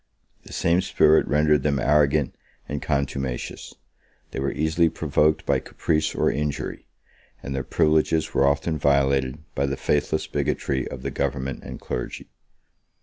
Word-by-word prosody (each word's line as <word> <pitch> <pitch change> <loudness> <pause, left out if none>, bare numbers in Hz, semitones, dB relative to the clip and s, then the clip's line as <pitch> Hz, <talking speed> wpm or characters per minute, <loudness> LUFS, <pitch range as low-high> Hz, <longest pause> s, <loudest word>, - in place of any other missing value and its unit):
The - - -13
same 85 +2 +2
spirit 80 -3 +4
rendered 75 -1 +3
them 70 0 +1
arrogant 75 +1 +2 0.3
and 75 0 -4
contumacious: 70 -3 -3 0.6
they - - -4
were 70 0 0
easily 80 +2 +2
provoked 75 0 +1
by - - +2
caprice 80 -1 -1
or - - +2
injury; 75 0 -3 0.6
and 70 - -4
their 70 - -2
privileges 80 0 +1
were 70 - +3
often 75 +2 0
violated 70 -1 +2 0.2
by 70 +1 0
the 70 -1 -2
faithless 75 +1 0
bigotry 65 -2 -1
of 65 0 -8
the - - -3
government 70 -1 -3
and - - -8
clergy. 60 - -5
70 Hz, 145 wpm, -24 LUFS, 70-75 Hz, 0.6 s, spirit